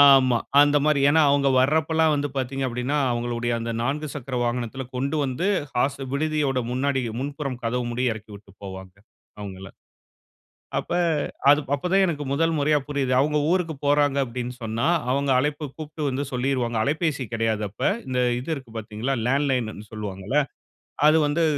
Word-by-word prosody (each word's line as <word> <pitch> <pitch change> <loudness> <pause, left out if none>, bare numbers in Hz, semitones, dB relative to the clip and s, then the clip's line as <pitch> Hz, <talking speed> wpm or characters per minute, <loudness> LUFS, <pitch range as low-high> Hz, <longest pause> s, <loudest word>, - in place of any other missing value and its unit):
ஆமா, 135 -3 +7 0.3
அந்த 145 0 +3
மாரி. 150 -2 +3
ஏன்னா 160 +1 +5
அவங்க 140 -1 +3
வர்றப்பலாம் 160 +3 +3
வந்து 145 0 -1
பார்த்தீங்க 135 +1 -2
அப்படின்னா, 125 +4 -2 0.2
அவங்களுடைய 120 0 -2
அந்த 115 0 -3
4 150 +5 -2
சக்கர 135 -2 -6
வாகனத்தில 120 +2 -2
கொண்டு 140 +4 -1
வந்து, 135 +8 -2 0.3
ஹாஸ்டல் 135 +1 -1
விடுதியோட 150 -2 0
முன்னாடி 135 +1 0 0.2
முன்புறம் 140 -2 -4
கதவு 120 +1 -1
முடிய 125 -1 +1
இறக்கி 110 0 -11
விட்டு 100 0 -14
போவாங்க 95 -1 -9 0.4
அவங்கள. 95 -1 -7 1.1
அப்ப - - -5 0.6
அது 145 +1 +6
அப்ப 145 - -5
தான் 195 - +5
எனக்கு 150 -4 -2
முதல் 165 +3 +2
முறையா 150 +1 +3
புரியுது. 140 -3 -1
அவங்க 150 +2 +1
ஊருக்கு 175 -3 +1
போறாங்க 145 -1 +3
அப்படின்னு 125 0 -5
சொன்னா, 115 +1 -2 0.3
அவங்க 140 +1 +1
அழைப்பு 150 +3 -1
கூப்பிட்டு 155 0 -7
வந்து 135 +1 -2
சொல்லிருவாங்க. 125 -2 0
அலைபேசி 150 0 0
கிடையாது 110 -1 0
அப்ப. 105 - -21 0.3
இந்த 130 -1 -2 0.2
இது 125 +6 -8
இருக்கு 130 -5 -10
பார்த்தீங்களா, 110 +5 -3
லேண்ட்லைன்னுன்னு 125 -6 0
சொல்லுவாங்கல? 105 +2 -4 0.7
அது 160 +1 +6
வந்து 155 +3 +1
135 Hz, 155 wpm, -24 LUFS, 120-145 Hz, 1.1 s, ஆமா